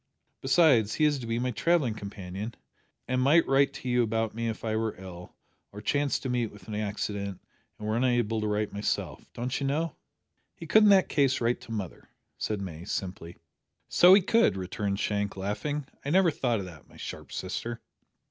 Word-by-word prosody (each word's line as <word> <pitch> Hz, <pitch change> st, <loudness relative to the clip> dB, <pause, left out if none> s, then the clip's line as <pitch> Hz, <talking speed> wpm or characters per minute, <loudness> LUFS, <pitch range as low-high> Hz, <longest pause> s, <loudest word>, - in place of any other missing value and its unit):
Besides, 135 Hz, -7 st, +4 dB
he 155 Hz, -, +3 dB
is 145 Hz, -2 st, +2 dB
to 120 Hz, -, -6 dB
be 115 Hz, 0 st, -1 dB
my 125 Hz, +1 st, -1 dB
travelling 135 Hz, +1 st, +2 dB
companion, 100 Hz, +1 st, -7 dB, 0.5 s
and 130 Hz, 0 st, +1 dB
might 155 Hz, +6 st, +5 dB
write 140 Hz, +1 st, +4 dB
to 130 Hz, -, -8 dB
you 125 Hz, 0 st, +3 dB
about 115 Hz, -1 st, 0 dB
me 115 Hz, +1 st, -3 dB
if 115 Hz, 0 st, -4 dB
I 110 Hz, -1 st, 0 dB
were 110 Hz, 0 st, -1 dB
ill, 90 Hz, -2 st, -10 dB, 0.4 s
or 105 Hz, -, -9 dB
chanced 145 Hz, +7 st, 0 dB
to 130 Hz, -, -2 dB
meet 120 Hz, -3 st, 0 dB
with 100 Hz, -3 st, -15 dB
an 110 Hz, -, -6 dB
accident 100 Hz, -2 st, -3 dB, 0.4 s
and 105 Hz, -, -6 dB
were 110 Hz, -, 0 dB
unable 120 Hz, -3 st, +1 dB
to 105 Hz, -, -1 dB
write 105 Hz, 0 st, -1 dB
myself 105 Hz, +1 st, -3 dB
don't 125 Hz, +3 st, -3 dB
you 140 Hz, -, 0 dB
know?" 155 Hz, +3 st, -1 dB, 0.6 s
"He 165 Hz, -, -9 dB
could 215 Hz, +6 st, +5 dB
in 210 Hz, -, +6 dB
that 195 Hz, -2 st, +6 dB
case 135 Hz, -3 st, +2 dB
write 120 Hz, +1 st, 0 dB
to -, -, -11 dB
mother," 100 Hz, -5 st, -6 dB, 0.3 s
said 105 Hz, -2 st, -2 dB
May, 85 Hz, -4 st, -6 dB
simply. 90 Hz, -3 st, -5 dB, 0.5 s
"So 180 Hz, +2 st, +8 dB
he 200 Hz, -, +4 dB
could!" 225 Hz, -, +3 dB
returned 100 Hz, +2 st, -3 dB
Shank, 100 Hz, -1 st, -1 dB
laughing. 135 Hz, +10 st, -3 dB, 0.2 s
"I 140 Hz, -, -3 dB
never 180 Hz, +1 st, +4 dB
thought 120 Hz, -7 st, 0 dB
o' -, -, -5 dB
that, 85 Hz, -4 st, -12 dB
my -, -, -17 dB
sharp -, -, -8 dB
sister." 115 Hz, +5 st, -4 dB
115 Hz, 195 wpm, -28 LUFS, 105-135 Hz, 0.6 s, So